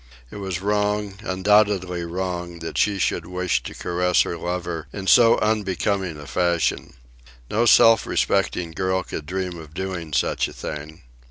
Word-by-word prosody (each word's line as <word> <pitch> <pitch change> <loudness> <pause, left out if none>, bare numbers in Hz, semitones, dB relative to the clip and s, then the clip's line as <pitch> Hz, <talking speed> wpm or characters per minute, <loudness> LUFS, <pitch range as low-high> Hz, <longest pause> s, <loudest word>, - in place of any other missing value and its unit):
It - - -8
was 95 -3 -4
wrong, 105 0 -1
undoubtedly 95 -2 +2
wrong, 90 0 -4
that 80 0 -7
she 105 -1 +2
should 95 - -1
wish 90 0 -1
to - - -8
caress 90 0 +1
her - - -4
lover 85 -2 -4
in 100 -2 -6
so 115 +5 +6
unbecoming 100 -4 -1
a 75 - -10
fashion. 85 +1 0 0.6
No 115 +3 +2
self 115 0 +6
respecting 85 -2 0
girl 95 +3 -1
could 75 -4 -7
dream 90 -1 -3
of 80 0 -12
doing 90 -4 -4
such 70 - +1
a - - -11
thing. 75 +1 -7
90 Hz, 155 wpm, -23 LUFS, 85-100 Hz, 0.6 s, so